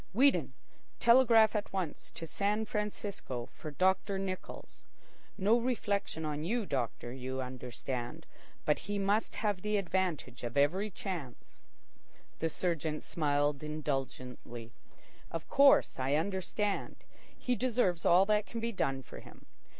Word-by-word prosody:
Weedon, 195 - +4 0.5
telegraph 235 -3 +6
at 210 - -1
once 185 -6 -3
to 165 - -5
San 205 +6 0
Francisco 205 - -4
for 155 - -7
Doctor 190 +5 +1
Nichols. 190 -1 -6 0.5
No 215 +4 +4
reflection 205 -9 -1
on 150 0 -2
you, 220 +6 0
doctor, 120 - -2
you 130 0 -4
understand; 125 -1 -5 0.4
but 150 - +3
he 205 - 0
must 200 +2 +1
have 205 -4 0
the 210 +1 +1
advantage 180 -10 -1
of 120 +3 -3
every 180 +9 +3
chance." 175 - -7 0.8
The 165 - +1
surgeon 160 -3 -1
smiled 145 -2 0
indulgently. 135 -6 -4 0.6
"Of 165 - -5
course 280 - +5
I 135 +2 +2
understand. 195 +4 -1 0.4
He 250 - 0
deserves 235 -9 +1
all 180 +3 +6
that 210 0 +2
can 230 - -5
be 230 +1 -1
done 135 -10 -1
for - - -10
him. - - -15
180 Hz, 130 wpm, -32 LUFS, 140-210 Hz, 0.8 s, telegraph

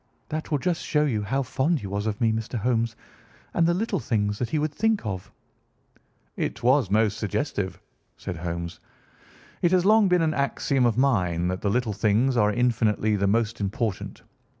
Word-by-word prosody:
That 155 +1 -4
will 150 - +1
just 170 +4 -1
show 150 -1 +1
you 115 -7 0
how 135 +7 -1
fond 140 +6 0
he - - -7
was 100 +2 -3
of 105 -1 -2
me, 115 -2 +3
Mr. 110 +2 -3
Holmes, 115 0 0 0.6
and 165 -1 +3
the 170 - +3
little 205 -1 -1
things 105 -4 -1
that 120 - -2
he 155 - 0
would 150 0 -1
think 220 - +1
of." 95 -3 -5 1.0
"It 110 +2 -3
was 125 -4 +3
most 110 0 +2
suggestive," 100 -3 -2 0.4
said 90 -4 -6
Holmes. 85 0 -5 0.8
"It 175 - +4
has 185 -1 +3
long 215 0 +5
been 180 -2 +3
an 155 -1 +1
axiom 140 -2 +1
of 115 -1 0
mine 90 -10 +2
that 90 0 -3
the 100 - 0
little 120 0 0
things 110 +6 +2
are 105 -3 +3
infinitely 110 -2 +1
the 100 0 +1
most 115 +2 0
important. 105 0 -3
115 Hz, 185 wpm, -25 LUFS, 105-145 Hz, 1.0 s, long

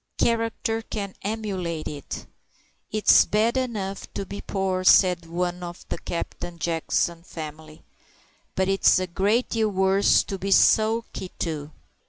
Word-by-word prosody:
Character 225 -1 0
can 200 -3 -5
emulate 190 -6 -3
it. 145 -2 -6 0.7
"It's 215 0 +6
bad 220 +3 +1
enough 210 -7 -3
to 195 - -3
be 200 +2 -7
poor," 190 -2 -2
said 180 -2 +5
one 175 +1 -2
of 175 0 -8
the - - -3
Captain 175 0 -5
Jackson 165 +1 -1
family, 155 -2 -9 0.7
"but 190 0 +1
it's 195 0 +4
a 185 - 0
great 200 +7 +1
deal 220 -1 +1
worse 190 0 +3
to 195 - -5
be 195 - -3
sulky 220 -1 +3
too." 155 -3 -3
190 Hz, 135 wpm, -25 LUFS, 170-215 Hz, 0.7 s, It's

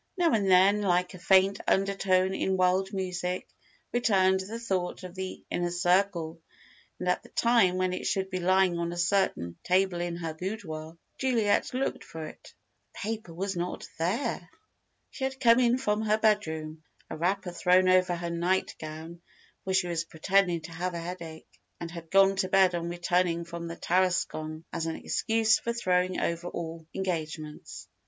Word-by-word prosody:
Now 345 -2 +3
and 205 -4 +2
then, 190 +3 +5
like 180 -2 +1
a 185 - -10
faint 190 +2 +4
undertone 190 -1 +2
in 190 0 0
wild 185 +1 +2
music, 180 -1 -3 0.5
returned 190 -6 +3
the 205 +5 -5
thought 190 -6 -2
of 180 -1 -8
the 190 0 -6
Inner 175 0 0
Circle, 175 -2 +1 0.6
and 180 - -5
at 180 - +1
the - - -17
time 230 -6 +3
when 185 0 0
it - - -3
should 190 0 -1
be 185 - -2
lying 185 -1 +3
on 170 0 -2
a 175 - -6
certain 170 - 0
table 185 -1 +2
in 175 -1 -2
her 165 -2 -4
boudoir, 160 -3 -6 0.2
Juliet 235 -6 +2
looked 265 +1 -2
for 160 -1 -7
it. - - -12 0.4
The - - -15
paper 220 -5 -5
was 190 +3 -3
not 175 +1 -4
there! 185 - -1 0.6
She 265 - -7
had 265 0 -4
come 235 -1 +6
in 245 0 +3
from 210 -5 0
her 215 0 +2
bedroom, 160 -8 0 0.3
a - - -6
wrapper 180 +3 -1
thrown 180 +1 +3
over 185 -1 +4
her 170 0 -4
nightgown, 170 -2 -3 0.4
for 190 - -1
she 190 - +3
was 170 -1 -2
pretending 175 +1 +1
to 160 +2 -10
have 175 +2 -3
a - - -3
headache, 170 -2 -8 0.2
and 170 -1 -6
had 170 -2 -9
gone 195 +1 +5
to 190 - +1
bed 190 -1 +4
on 170 0 -2
returning 175 -1 0
from 170 0 -6
the 165 - -6
Tarascon, 165 -3 0
as 165 -1 -2
an 160 - -2
excuse 225 -1 +2
for 235 - -2
throwing 185 -5 +1
over 170 +1 -2
all 165 -2 -6
engagements. 160 -5 -4
180 Hz, 175 wpm, -28 LUFS, 170-195 Hz, 0.6 s, come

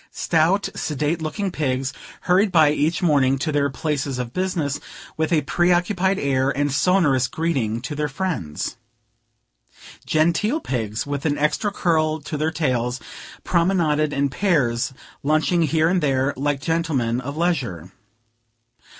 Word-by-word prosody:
Stout, 170 +5 +1
sedate 150 +2 -2
looking 185 +5 -2
pigs, 135 -4 -1 0.3
hurried 190 +3 +3
by 155 -4 +5
each 155 +4 0
morning 135 -5 +3
to 155 +4 -2
their 145 -1 +1
places 140 -1 -2
of 125 -1 -4
business, 175 -7 -1 0.4
with 160 +1 -1
a 155 -3 +3
preoccupied 180 +4 +1
air, 135 -1 +1
and 145 +1 0
sonorous 145 -5 +3
greeting 130 -7 -1
to 125 +4 -5
their 150 0 -1
friends. 140 - -3 1.3
Genteel 170 - +2
pigs, 110 - -3
with 145 -1 -4
an 145 - 0
extra 150 +8 0
curl 160 -5 +1
to 150 +2 -5
their 155 +2 0
tails, 125 -6 -1 0.4
promenaded 170 -4 +2
in 140 0 0
pairs, 135 -9 +1 0.3
lunching 155 +3 +2
here 160 0 +2
and 180 +1 +2
there, 135 -1 +1
like 140 +1 -1
gentlemen 135 -7 0
of 140 +3 -6
leisure. 125 - -1
150 Hz, 135 wpm, -22 LUFS, 135-170 Hz, 1.3 s, by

